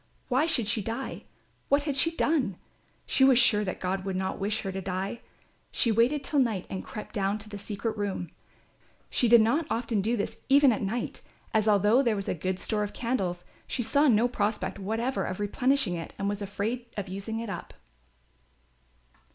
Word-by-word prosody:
"Why 270 +5 +2
should 250 -10 +2
she 215 0 +1
die; 230 +6 -5 0.4
what 285 +1 +3
had 290 -2 -2
she 305 +4 +6
done? 295 - 0 0.5
She 265 - +2
was 265 -2 +6
sure 215 -4 +5
that 185 - -4
God 190 +1 -2
would 190 -1 -3
not 190 0 -2
wish 205 +2 -1
her 195 - -3
to 190 0 -4
die." 190 +4 -3 0.5
She 230 - +2
waited 245 +6 +2
till 290 +1 +1
night 225 -8 +1
and 190 - -4
crept 215 - -8
down 200 0 0
to 215 0 -8
the 205 -1 -7
secret 215 +2 -3
room. 195 -5 -3 0.8
She 245 - +2
did 235 0 +7
not 285 +9 +1
often 230 -3 0
do 230 +4 0
this 205 - -3
even 280 -1 +6
at 215 - -1
night, 220 +4 -3 0.3
as 220 -1 +3
although 210 +4 +4
there 235 -5 +1
was 200 -1 -4
a - - 0
good 185 +2 -2
store 210 +2 -1
of 205 -1 -3
candles 190 -8 -2 0.2
she 245 - -2
saw 285 +6 +3
no 235 -1 +4
prospect 210 -4 -2
whatever 225 +6 -1
of 185 - -4
replenishing 245 +1 +1
it 165 -1 -6
and 200 - -2
was 205 0 -2
afraid 205 +5 -3
of 200 -1 -3
using 200 +4 -4
it 230 -3 -4
up. - - -7
215 Hz, 195 wpm, -28 LUFS, 195-245 Hz, 0.8 s, did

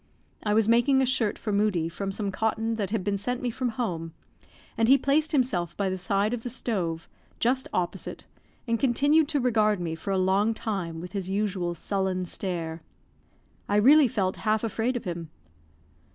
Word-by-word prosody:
I 210 -1 0
was 220 -1 +3
making 240 +4 +4
a 265 - +3
shirt 240 -5 +1
for 215 - -4
Moodie 200 -5 +1
from 195 +4 -4
some 200 0 -2
cotton 220 +2 -1
that 200 -4 -2
had 210 -3 -1
been 200 0 -1
sent 245 +4 -2
me 250 -2 -2
from 250 +2 -2
home, 175 -10 -3 0.6
and 225 - +2
he 270 +3 +7
placed 290 +4 +1
himself 240 - 0
by 195 -2 0
the 190 - -2
side 200 +4 0
of 245 - -3
the 245 - -5
stove, 180 -10 -2 0.3
just 255 +2 +1
opposite, 180 +1 -3 0.4
and 230 -1 +1
continued 285 +4 +3
to 295 -1 0
regard 215 -5 +2
me 170 -2 -3
for 165 +4 -6
a 195 - +1
long 195 +4 +2
time 180 -8 -3
with 180 0 -8
his 190 -2 -4
usual 190 -3 -1
sullen 190 +1 -1
stare. 170 -3 -4 0.9
I 205 - +2
really 275 +7 +7
felt 195 -6 -1
half 215 0 0
afraid 230 +3 -1
of - - -6
him. 170 -3 -5
210 Hz, 185 wpm, -27 LUFS, 185-240 Hz, 0.9 s, he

